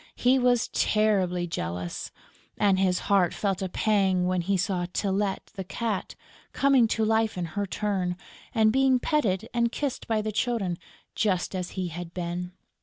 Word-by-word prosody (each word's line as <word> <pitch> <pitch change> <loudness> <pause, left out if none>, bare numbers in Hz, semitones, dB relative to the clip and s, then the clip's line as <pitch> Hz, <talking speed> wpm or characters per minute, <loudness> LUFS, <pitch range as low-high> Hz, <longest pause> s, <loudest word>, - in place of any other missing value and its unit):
He 255 +2 +3
was 245 -1 +3
terribly 190 -5 +1
jealous; 90 - -4 0.5
and 195 -2 +3
his 185 -1 +2
heart 195 -4 +2
felt 195 -2 -1
a 190 - -2
pang 190 -3 +2
when 180 0 +1
he 195 +3 0
saw 180 -1 -1
Tylette, 195 0 -1
the 195 -3 -5
Cat, 210 +2 -3 0.4
coming 270 -4 +4
to 220 0 0
life 220 -2 +1
in 175 - -1
her 205 0 -1
turn 185 -3 -1 0.3
and 220 -2 +3
being 265 -1 +4
petted 225 - 0
and 235 -1 +1
kissed 280 -1 -3
by 220 -2 0
the 215 - -2
Children, 210 -6 -1 0.3
just 190 -4 0
as 180 -1 -3
he 185 -2 -1
had 170 +1 -7
been! 180 0 -3
195 Hz, 165 wpm, -27 LUFS, 180-220 Hz, 0.5 s, coming